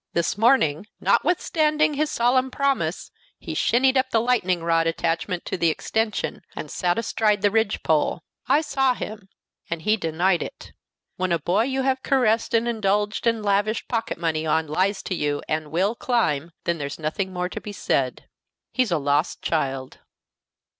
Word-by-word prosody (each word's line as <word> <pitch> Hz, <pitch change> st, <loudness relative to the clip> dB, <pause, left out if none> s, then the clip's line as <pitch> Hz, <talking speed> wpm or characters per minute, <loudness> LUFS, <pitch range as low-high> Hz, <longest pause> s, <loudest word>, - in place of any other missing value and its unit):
This 170 Hz, -1 st, 0 dB
morning, 210 Hz, -, +3 dB
notwithstanding 310 Hz, -3 st, +2 dB
his 300 Hz, +1 st, 0 dB
solemn 255 Hz, +1 st, +2 dB
promise, 260 Hz, -, -1 dB, 0.3 s
he -, -, -7 dB
shinned 260 Hz, +3 st, +3 dB
up 260 Hz, 0 st, +2 dB
the 230 Hz, -, +2 dB
lightning 200 Hz, -8 st, +1 dB
rod 165 Hz, 0 st, +2 dB
attached 165 Hz, +2 st, -1 dB, 0.2 s
to -, -, -3 dB
the 170 Hz, -1 st, +3 dB
extension, 220 Hz, +7 st, -2 dB
and -, -, -6 dB
sat 175 Hz, -2 st, 0 dB
astride 215 Hz, -2 st, +1 dB
the 205 Hz, -, +4 dB
ridge 225 Hz, +1 st, +1 dB
pole. -, -, +1 dB, 0.2 s
I 295 Hz, -, +4 dB
saw 270 Hz, -4 st, +1 dB
him, 210 Hz, -4 st, -7 dB, 0.4 s
and 165 Hz, -1 st, -4 dB
he 215 Hz, +4 st, +3 dB
denied 170 Hz, 0 st, +1 dB
it! -, -, -8 dB, 0.4 s
When 185 Hz, -1 st, -1 dB
a 170 Hz, -, +3 dB
boy 180 Hz, +7 st, +1 dB
you 265 Hz, 0 st, -1 dB
have 260 Hz, 0 st, +1 dB
caressed 235 Hz, -5 st, +2 dB
and 230 Hz, +1 st, +2 dB
indulged 210 Hz, -1 st, 0 dB
and 230 Hz, -2 st, +1 dB
lavished 205 Hz, +2 st, +1 dB
pocket 230 Hz, -2 st, -2 dB
money 160 Hz, -2 st, -1 dB
on 160 Hz, 0 st, +1 dB
lies 185 Hz, +6 st, 0 dB
to -, -, -3 dB
you 145 Hz, -4 st, -1 dB
and 155 Hz, -1 st, -2 dB
will 185 Hz, +7 st, +1 dB
climb, 170 Hz, -, 0 dB
then 170 Hz, -1 st, -1 dB
there's 140 Hz, -1 st, -4 dB
nothing 165 Hz, +5 st, -3 dB
more 180 Hz, -1 st, -2 dB
to -, -, -6 dB
be 210 Hz, -, -7 dB
said. 135 Hz, -9 st, -1 dB, 0.4 s
He's 255 Hz, -3 st, +1 dB
a 170 Hz, -, +1 dB
lost 145 Hz, +2 st, 0 dB
child." 135 Hz, -4 st, -2 dB
205 Hz, 170 wpm, -24 LUFS, 165-235 Hz, 0.4 s, the